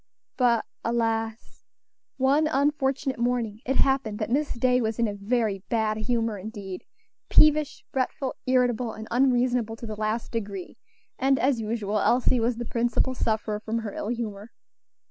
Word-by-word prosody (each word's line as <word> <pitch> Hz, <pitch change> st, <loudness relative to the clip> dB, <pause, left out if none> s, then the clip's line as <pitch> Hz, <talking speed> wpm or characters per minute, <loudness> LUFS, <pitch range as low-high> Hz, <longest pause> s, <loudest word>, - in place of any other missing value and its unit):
But, 235 Hz, -3 st, +3 dB, 0.2 s
alas! 225 Hz, -1 st, -2 dB, 0.5 s
one 275 Hz, +4 st, +3 dB
unfortunate 275 Hz, -2 st, 0 dB
morning 235 Hz, -3 st, -1 dB
it 265 Hz, -, +1 dB
happened 265 Hz, -7 st, +2 dB
that 215 Hz, +1 st, -3 dB
Miss 290 Hz, +3 st, +1 dB
Day 250 Hz, +1 st, +2 dB
was 220 Hz, -1 st, -1 dB
in 235 Hz, -1 st, +2 dB
a 205 Hz, -, -3 dB
very 205 Hz, 0 st, 0 dB
bad 220 Hz, -2 st, +1 dB
humor 225 Hz, -1 st, -1 dB
indeed 195 Hz, -2 st, -7 dB, 0.5 s
peevish, 305 Hz, -1 st, +4 dB
fretful, 265 Hz, +1 st, -1 dB
irritable, 245 Hz, -3 st, +2 dB
and 220 Hz, +1 st, -8 dB
unreasonable 245 Hz, -2 st, +2 dB
to 230 Hz, -, -9 dB
the 215 Hz, -1 st, -5 dB
last 215 Hz, +2 st, -2 dB
degree; 200 Hz, -5 st, -5 dB, 0.4 s
and, 270 Hz, +1 st, +3 dB
as 260 Hz, -3 st, +1 dB
usual, 215 Hz, -1 st, -1 dB
Elsie 250 Hz, +3 st, +3 dB
was 230 Hz, +1 st, 0 dB
the 240 Hz, -, -4 dB
principal 240 Hz, +3 st, 0 dB
sufferer 215 Hz, -3 st, -1 dB
from 220 Hz, +1 st, -3 dB
her 220 Hz, -3 st, -4 dB
ill -, -, -4 dB
humor. 220 Hz, -3 st, -4 dB
235 Hz, 150 wpm, -26 LUFS, 220-255 Hz, 0.5 s, peevish